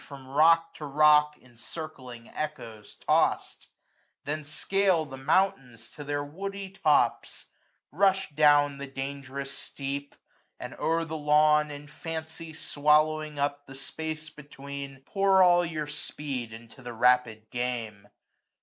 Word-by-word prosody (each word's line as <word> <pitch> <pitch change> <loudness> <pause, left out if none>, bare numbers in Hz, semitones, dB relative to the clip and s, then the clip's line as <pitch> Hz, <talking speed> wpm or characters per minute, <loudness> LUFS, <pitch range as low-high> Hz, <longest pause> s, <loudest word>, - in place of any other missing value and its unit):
From 135 0 -12
rock 165 +4 +4
to 150 - -6
rock, 150 +1 +4
in 125 -1 -22
circling 125 -3 -9
echoes 120 -9 -6
tost; - - +1 0.6
Then 155 +1 -3
scale 185 +3 +1
the 135 -2 -9
mountains 135 - 0
to 145 - -9
their 145 0 -2
woody 195 +6 -6
tops; 155 -6 +1 0.5
Rush 195 +2 +2
down 145 -1 +4
the 140 - -5
dangerous 135 0 -6
steep; 140 +1 -5 0.4
and - - -7
o'er 165 +1 +1
the 160 0 -5
lawn. 150 0 +4
In 145 0 -8
fancy 160 +1 -7
swallowing 155 0 +1
up 145 0 -2
the 135 - -10
space 155 +2 -5
between, 140 -2 -9
485 - - -46
Pour 195 -1 +5
all 175 -1 +5
your 155 -3 -3
speed 145 -4 -5
into 115 +3 -12
the 120 -1 -7
rapid 115 -2 +2
game. 115 -5 -4
145 Hz, 130 wpm, -28 LUFS, 135-155 Hz, 0.6 s, Pour